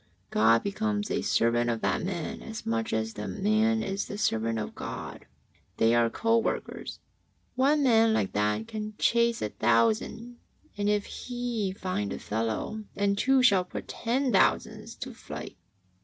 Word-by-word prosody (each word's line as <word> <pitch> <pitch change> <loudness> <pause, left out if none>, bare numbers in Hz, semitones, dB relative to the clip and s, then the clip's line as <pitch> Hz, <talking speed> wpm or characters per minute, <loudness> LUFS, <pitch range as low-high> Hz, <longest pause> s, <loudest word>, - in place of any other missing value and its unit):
God 115 +2 +4
becomes 210 0 -1
a - - 0
servant 120 +1 +2
of 115 -1 -1
that - - 0
man 175 -3 -4
as 225 0 -7
much 115 0 -1
as 110 0 -1
that 105 - -5
man 220 +2 +2
is 195 0 -3
the 205 - -6
servant 115 - 0
of 105 - -4
God. - - -7 0.5
They 115 +1 +4
are 120 -1 +4
co 230 - +2
workers. 225 - -3 0.6
One 285 +3 +3
man 225 -3 +5
like 160 - +1
that 105 +1 0
can 215 -1 -5
chase 235 0 +2
a 105 - -1
thousand, 115 - +1 0.4
and 205 0 0
if 210 -1 +1
he 240 -5 -3
find 185 - -3
a - - -4
fellow, 115 - -3
the 200 0 +2
two 260 +5 +3
shall 195 -7 +5
put 180 - -7
ten 255 +3 0
thousand 195 - +2
to - - -5
flight. - - -8
200 Hz, 160 wpm, -28 LUFS, -, 0.6 s, man